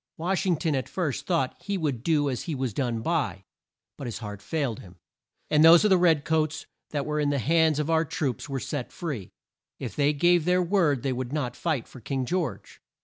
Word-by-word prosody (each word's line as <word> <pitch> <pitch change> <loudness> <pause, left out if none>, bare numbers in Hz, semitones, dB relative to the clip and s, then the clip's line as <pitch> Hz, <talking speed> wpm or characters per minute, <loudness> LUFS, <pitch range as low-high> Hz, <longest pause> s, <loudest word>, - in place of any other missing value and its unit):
Wash 185 +4 -1
ing 175 -3 +3
ton 160 -1 0
at 130 -2 -2
first 165 -8 -2
thought 165 -4 0
he 200 +2 -2
would 145 -9 -2
do 150 0 +2
as 130 -3 -3
he 160 - -3
was 130 -4 -2
done 120 -2 -1
by, 125 - -1 0.6
but 135 - -5
his 115 - -4
heart 105 -3 -7
failed 140 -9 -2
him, 90 -1 -13 0.6
and 150 0 +5
those 165 +3 +8
of 210 - +3
the 190 - +7
red 160 -5 +3
coats 155 -1 0 0.2
that 145 -2 -2
were 150 0 -1
in 145 -1 +1
the 145 - +1
hands 160 +4 +3
of 150 -1 -1
our 160 0 +3
troops 150 -6 -3
were 135 -1 -2
set 135 -1 -4
free, 140 - -5 0.5
if - - -6
they 145 0 +3
gave 175 +3 +3
their 180 0 +3
word 165 - +2
they 135 -2 0
would 125 0 -4
not 145 -5 -2
fight 155 -9 -2
for 130 - -13
King 135 +2 -2
George. 160 - -3
150 Hz, 220 wpm, -26 LUFS, 130-165 Hz, 0.6 s, those